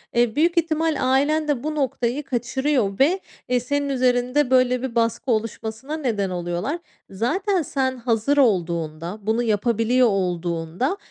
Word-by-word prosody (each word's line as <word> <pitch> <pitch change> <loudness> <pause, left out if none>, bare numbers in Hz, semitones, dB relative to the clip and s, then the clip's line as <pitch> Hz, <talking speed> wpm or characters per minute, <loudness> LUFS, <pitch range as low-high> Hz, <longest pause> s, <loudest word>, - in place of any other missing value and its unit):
E, 235 -2 +2
büyük 335 +3 +2
ihtimal 325 -1 +1
ailen 285 +4 +2
de 280 -4 -1
bu 305 0 -2
noktayı 265 -1 -1
kaçırıyor 250 -4 -1
ve, 325 +8 +4 0.3
ııı, 250 - +3
senin 285 +3 -1
üzerinde, 250 +1 +1
böyle, 255 -1 +3
bir 255 -3 -4
baskı 230 +2 0
oluşmasına 225 +5 -3
neden 220 -10 -1
oluyorlar. 175 - -3 0.3
Zaten 360 - 0
sen 265 -3 -1
hazır 235 +3 0
olduğunda, 170 - 0
bunu 220 +4 0
yapabiliyor 230 +3 +2
olduğunda, 180 - -1
245 Hz, 135 wpm, -23 LUFS, 215-285 Hz, 0.3 s, ve